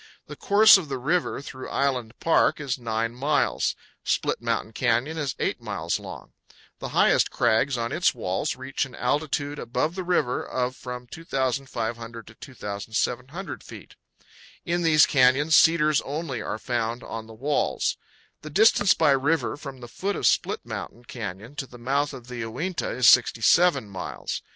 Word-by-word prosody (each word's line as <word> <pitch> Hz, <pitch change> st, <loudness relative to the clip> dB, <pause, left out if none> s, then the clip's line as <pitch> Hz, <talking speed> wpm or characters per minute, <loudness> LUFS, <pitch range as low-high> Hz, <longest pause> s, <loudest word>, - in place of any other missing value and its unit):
The -, -, -9 dB
course 205 Hz, 0 st, +6 dB
of 160 Hz, -6 st, -8 dB
the 135 Hz, -, -2 dB
river 150 Hz, +2 st, -1 dB
through 130 Hz, -2 st, -8 dB
Island 125 Hz, -4 st, -1 dB
Park 165 Hz, -, +3 dB
is 135 Hz, -3 st, -3 dB
9 115 Hz, 0 st, -2 dB
miles. 145 Hz, +4 st, 0 dB, 0.3 s
Split -, -, 0 dB
Mountain 115 Hz, -2 st, -2 dB
Canyon 120 Hz, +6 st, 0 dB
is 140 Hz, -3 st, -2 dB
8 -, -, -2 dB
miles -, -, -2 dB
long. -, -, -10 dB, 0.5 s
The -, -, -5 dB
highest -, -, +3 dB
crags 120 Hz, +3 st, +1 dB
on 115 Hz, 0 st, -2 dB
its 175 Hz, -, +2 dB
walls 95 Hz, -3 st, -2 dB
reach 130 Hz, +2 st, -3 dB
an 130 Hz, -3 st, -8 dB
altitude 145 Hz, -1 st, -1 dB
above 135 Hz, +7 st, -1 dB
the 185 Hz, 0 st, -4 dB
river 175 Hz, -9 st, 0 dB
of 125 Hz, 0 st, -2 dB
from 125 Hz, -1 st, -7 dB
2,500 120 Hz, -5 st, -3 dB
to 110 Hz, -, -14 dB
2,700 125 Hz, -, -4 dB
feet. -, -, -12 dB, 0.7 s
In 175 Hz, 0 st, 0 dB
these 155 Hz, -3 st, +6 dB
canyons 140 Hz, +3 st, +4 dB
cedars 155 Hz, -2 st, +5 dB
only 140 Hz, -4 st, -4 dB
are 110 Hz, -, -4 dB
found 120 Hz, +1 st, -2 dB
on 110 Hz, -1 st, -7 dB
the 110 Hz, -, -12 dB
walls. 140 Hz, +6 st, 0 dB, 0.5 s
The 155 Hz, -, -8 dB
distance 205 Hz, +3 st, +4 dB
by 145 Hz, -, +3 dB
river 140 Hz, +1 st, +1 dB
from 140 Hz, -3 st, -9 dB
the 120 Hz, -, -8 dB
foot 195 Hz, -, -3 dB
of -, -, -3 dB
Split -, -, +1 dB
Mountain 120 Hz, +1 st, -7 dB
Canyon 110 Hz, +2 st, -7 dB
to 135 Hz, -, -4 dB
the 125 Hz, -, -13 dB
mouth 140 Hz, +5 st, 0 dB
of 130 Hz, -4 st, -10 dB
the 125 Hz, 0 st, -8 dB
Uinta 130 Hz, +11 st, -3 dB
is 125 Hz, -2 st, +2 dB
67 120 Hz, -, +5 dB
miles. 95 Hz, -2 st, -5 dB
130 Hz, 160 wpm, -25 LUFS, 120-150 Hz, 0.7 s, course